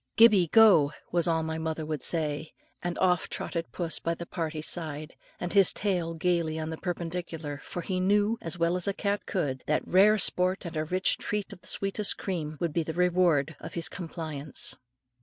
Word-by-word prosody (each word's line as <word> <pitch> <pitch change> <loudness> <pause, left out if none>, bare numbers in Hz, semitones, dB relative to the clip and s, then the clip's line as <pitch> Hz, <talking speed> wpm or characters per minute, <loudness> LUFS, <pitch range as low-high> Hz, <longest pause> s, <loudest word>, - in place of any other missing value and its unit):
"Gibbie, 215 -6 +6
go," 165 -8 +6 0.2
was 175 0 +3
all 165 -1 +1
my 160 0 -3
mother 160 -1 -3
would 155 -2 -3
say, 155 -2 0 0.3
and 175 -1 -3
off 180 -2 +2
trotted 170 -1 -4
puss 170 -3 -3
by 170 0 -1
the 170 - -7
party's 155 -2 -4
side, 155 -3 -4 0.2
with 175 - -3
his 195 -3 +6
tail 175 -5 -1
gaily 165 -2 0
on 160 0 -3
the 160 - -5
perpendicular; 165 -4 -4
for 175 - -6
he 185 -2 -2
knew, 205 +4 +2
as 165 +1 -2
well 170 +1 +1
as 180 +2 +1
cat 200 0 -1
could, 140 - -2
that 155 - 0
rare 205 +4 +5
sport 185 -1 0
and 170 - -6
a 155 0 -1
rich 185 +4 +2
treat 205 -1 -3
of 180 - -14
the - - -6
sweetest 200 +1 0
cream, 155 -5 -4
would 170 -3 -1
be 170 - +1
the 160 0 -4
reward 175 -4 +2
of - - -9
his 170 +1 +1
compliance. 155 -5 -3
170 Hz, 195 wpm, -28 LUFS, 160-185 Hz, 0.3 s, Gibbie